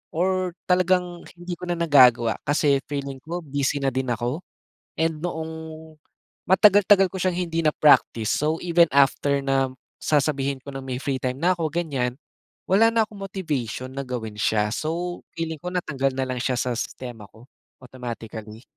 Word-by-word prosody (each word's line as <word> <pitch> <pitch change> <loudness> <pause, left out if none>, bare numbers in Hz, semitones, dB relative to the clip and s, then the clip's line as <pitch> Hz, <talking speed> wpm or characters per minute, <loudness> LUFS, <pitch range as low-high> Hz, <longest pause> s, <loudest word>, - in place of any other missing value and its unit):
or 185 0 0
talagang 180 -1 +2 0.2
hindi 175 +1 -6
ko 180 - -7
na 175 - +1
nagagawa 125 -8 +5
kasi 145 -1 +3
feeling 140 -2 -4
ko 170 +3 -5
busy 145 0 -1
na 135 - +2
din 130 +1 -2
ako. 120 +7 -2 0.6
And 160 -1 +1
noong 160 -2 -3 0.9
matagal-tagal 195 0 +5
ko 190 - -7
siyang 180 -1 0
hindi 165 0 -1
na-practice 145 -7 +4
so 155 +2 0
even 170 -1 +4
after 140 0 +3
na 135 -1 0 0.3
sasabihin 140 -2 0
ko 140 - -10
ng 135 0 -6
may 130 -1 -4
free 135 -2 -1
time 130 +1 -3
na'ko 175 -2 +2
gan'yan, 135 -8 -1 0.6
wala 210 +4 +5
na 225 -1 +4
akong 205 -2 -13
motivation 140 - -4
na 135 +1 -4
gawin 110 -4 -5
siya 105 0 +1
so 175 +6 -3 0.2
feeling 160 -2 -4
ko 180 - -8
natanggal 135 -6 -1
na 135 - 0
lang 130 -1 -3
siya 130 0 0
sa 125 - -1
sistema 120 -5 -6
ko, 110 - -17 0.4
automatically. 115 -3 -8
145 Hz, 160 wpm, -24 LUFS, 130-175 Hz, 0.9 s, nagagawa